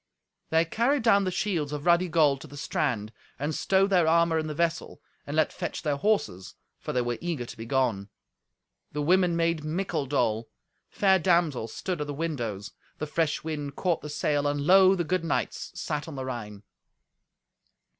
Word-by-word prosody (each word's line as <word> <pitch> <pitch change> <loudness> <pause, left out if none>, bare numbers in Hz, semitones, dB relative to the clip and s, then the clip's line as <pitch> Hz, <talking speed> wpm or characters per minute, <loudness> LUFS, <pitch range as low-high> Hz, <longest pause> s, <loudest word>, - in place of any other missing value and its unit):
They 160 +1 +3
carried 240 - +1
down 200 -4 +4
the - - +1
shields 175 -6 -1
of 150 0 -5
ruddy 175 +1 +4
gold 150 -5 +3
to - - -9
the 145 - -11
strand, 120 -7 -2 0.2
and 145 +3 -2
stowed 195 +5 +2
their 175 -4 +4
armour 165 0 +3
in 155 - -3
the 150 - -4
vessel, 170 +1 -1 0.3
and 145 - -4
let 155 - +2
fetch - - -5
their 145 -3 0
horses, 140 - -1 0.2
for - - -5
they 125 - 0
were 120 -1 -3
eager 165 -8 -3
to - - -9
be 115 +1 -8
gone. 115 -7 0 0.8
The 150 0 -2
women 180 +2 +3
made 165 -2 0
mickle 155 -2 -2
dole. 115 -5 0 0.4
Fair 190 -2 +3
damsels 160 -10 +1
stood 180 -5 -3
at 150 - -3
the 145 - -4
windows. 120 -11 -3 0.3
The 155 - -3
fresh 155 0 -1
wind 145 -3 -4
caught 175 -4 0
the 150 - -7
sail, 145 -1 0
and 145 0 -1
lo! 190 +2 +7
the 175 - -1
good 180 +2 -1
knights 165 - -2
sat 150 0 -3
on 160 - -7
the 130 -1 -4
Rhine. 105 -5 -6
155 Hz, 185 wpm, -27 LUFS, 140-175 Hz, 0.8 s, lo